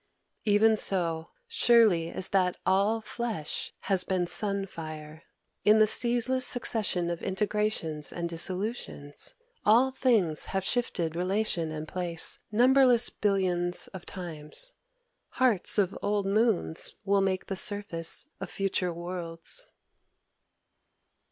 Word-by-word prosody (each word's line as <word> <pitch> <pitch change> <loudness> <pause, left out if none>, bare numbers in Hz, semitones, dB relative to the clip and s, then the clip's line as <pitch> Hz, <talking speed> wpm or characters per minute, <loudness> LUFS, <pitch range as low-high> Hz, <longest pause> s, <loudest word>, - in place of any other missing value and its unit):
"Even 220 +1 +4
so 165 -5 0 0.2
surely 230 - +3
as 185 - -1
that 185 -2 +1
all 200 +4 +2
flesh 220 -9 -4
has 190 -2 +2
been 185 -2 -1
sun 200 +1 0
fire! 155 -3 -9 0.4
In 210 +1 +5
the 215 - +6
ceaseless 245 +3 +2
succession 215 -8 +1
of 170 - -5
integrations 190 -7 -2
and 170 0 -4
dissolutions, 180 -3 -3 0.3
all 240 +5 +4
things 225 - +1
have 195 -1 -3
shifted 180 -8 -2
relation 180 -2 -1
and 155 0 -6
place 175 -2 0
numberless 250 +1 +4
billions 180 -3 0
of 190 -2 -11
times. 175 - -5 0.6
Hearts 245 -8 +4
of 195 -3 +1
old 205 -1 -1
moons 205 -5 0
will 200 0 +2
make 190 -1 -1
the 195 - -4
surface 190 -5 +2
of - - -6
future 190 -2 -2
worlds...." 170 - -5
195 Hz, 115 wpm, -28 LUFS, 170-220 Hz, 0.6 s, the